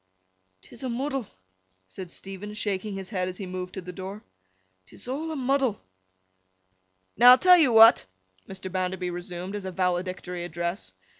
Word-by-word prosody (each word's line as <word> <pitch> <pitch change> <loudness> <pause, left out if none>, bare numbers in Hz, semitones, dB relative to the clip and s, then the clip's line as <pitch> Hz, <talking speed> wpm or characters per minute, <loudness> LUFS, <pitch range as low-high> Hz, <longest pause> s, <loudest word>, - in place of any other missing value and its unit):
''Tis 235 - -12
a 260 - -2
muddle,' 265 -1 -3 0.6
said 180 - -9
Stephen, 195 +4 -7
shaking 205 -1 -3
his 195 +1 -7
head 185 -3 -1
as 185 0 -6
he 195 - -6
moved 185 0 -6
to 190 - -5
the 180 0 -9
door. 195 +3 -8 0.6
''Tis - - -10
a' 255 - -2
a 315 +3 -4
muddle!' 265 -4 0 1.4
'Now, 240 +3 +8
I'll 250 - +10
tell 360 +4 +7
you 285 -7 +4
what!' 225 +1 +7 0.4
Mr. 190 -1 -7
Bounderby 185 -1 -2
resumed, 175 +2 -6
as 205 -2 -5
a 190 - -4
valedictory 180 -1 -2
address. 175 +2 -4
190 Hz, 160 wpm, -26 LUFS, 180-235 Hz, 1.4 s, I'll